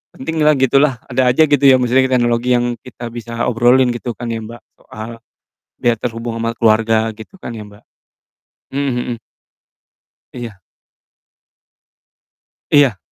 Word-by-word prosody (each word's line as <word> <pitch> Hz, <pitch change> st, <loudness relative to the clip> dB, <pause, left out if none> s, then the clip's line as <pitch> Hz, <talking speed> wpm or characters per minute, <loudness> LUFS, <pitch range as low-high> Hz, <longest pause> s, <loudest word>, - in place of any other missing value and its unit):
penting 160 Hz, +3 st, -2 dB
lah, 155 Hz, -, +6 dB
gitu 135 Hz, +1 st, +4 dB
lah, 135 Hz, -5 st, 0 dB
ada 125 Hz, -1 st, +2 dB
aja, 155 Hz, +5 st, +4 dB
gitu 145 Hz, -1 st, +1 dB
ya, 130 Hz, -2 st, +7 dB
maksudnya 130 Hz, +1 st, +2 dB
teknologi 120 Hz, 0 st, +1 dB
yang 120 Hz, 0 st, 0 dB
kita 120 Hz, -1 st, -8 dB
bisa 115 Hz, 0 st, -4 dB
obrolin, 125 Hz, +2 st, +3 dB
gitu 120 Hz, 0 st, -4 dB
kan 120 Hz, -, -6 dB
ya, 115 Hz, -, -3 dB
Mbak, 115 Hz, +2 st, -10 dB, 0.2 s
soal, 110 Hz, +2 st, -9 dB, 0.7 s
dia 120 Hz, -1 st, +2 dB
terhubung 115 Hz, 0 st, -4 dB
sama 115 Hz, 0 st, -2 dB
keluarga, 110 Hz, 0 st, +2 dB
gitu 110 Hz, -, -13 dB
kan 120 Hz, -, -7 dB
ya, 110 Hz, -, -7 dB
Mbak. 100 Hz, 0 st, -17 dB, 0.9 s
Mmm, 140 Hz, 0 st, 0 dB
mhm. 120 Hz, -1 st, -3 dB, 1.2 s
Iya. 115 Hz, -6 st, -8 dB, 2.1 s
Iya. 135 Hz, -9 st, +4 dB
120 Hz, 140 wpm, -17 LUFS, 115-130 Hz, 2.1 s, ya